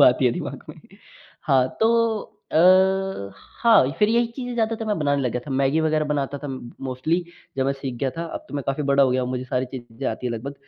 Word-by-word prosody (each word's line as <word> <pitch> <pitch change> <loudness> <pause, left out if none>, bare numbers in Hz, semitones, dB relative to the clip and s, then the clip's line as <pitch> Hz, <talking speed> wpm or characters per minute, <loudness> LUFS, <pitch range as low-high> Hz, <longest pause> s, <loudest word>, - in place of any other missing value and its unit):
वो - - +8
आती 125 +1 +4
है 120 - +3
दिमाग - - -5
में। - - -11 0.6
हाँ, 130 -2 +3
तो 225 +1 +4 0.6
अ, 185 - +3 0.3
हाँ, 225 - +6
फ़िर 210 - +4
यही 235 +1 +3
चीज़ें 250 -2 -4
ज़्यादातर 225 -1 -1
मैं 210 -3 0
बनाने 145 -2 +1
लग 125 - 0
गया 125 - -2
था - - -7
मैगी 135 +3 +2
वग़ैरह 155 -1 +1
बनाता 145 -1 -2
था 145 - -7
म 130 -1 -6 0.2
मोस्टली 155 +7 -1 0.3
जब 135 0 +1
मैं 135 - +2
सीख 135 -2 -5
गया 135 - 0
था। 165 - -2
अब - - -6
तो - - -9
मैं 140 - -2
काफ़ी 135 +2 -1
बड़ा 140 0 +5
हो 130 - +4
गया 130 0 +1
हूँ 125 - -3
मुझे 130 0 -3
सारी 130 0 -1
चीज़ें 120 +1 -6
आती 125 - -4
है 120 - -1
लगभग। 130 +5 -5
140 Hz, 240 wpm, -23 LUFS, 130-180 Hz, 0.6 s, वो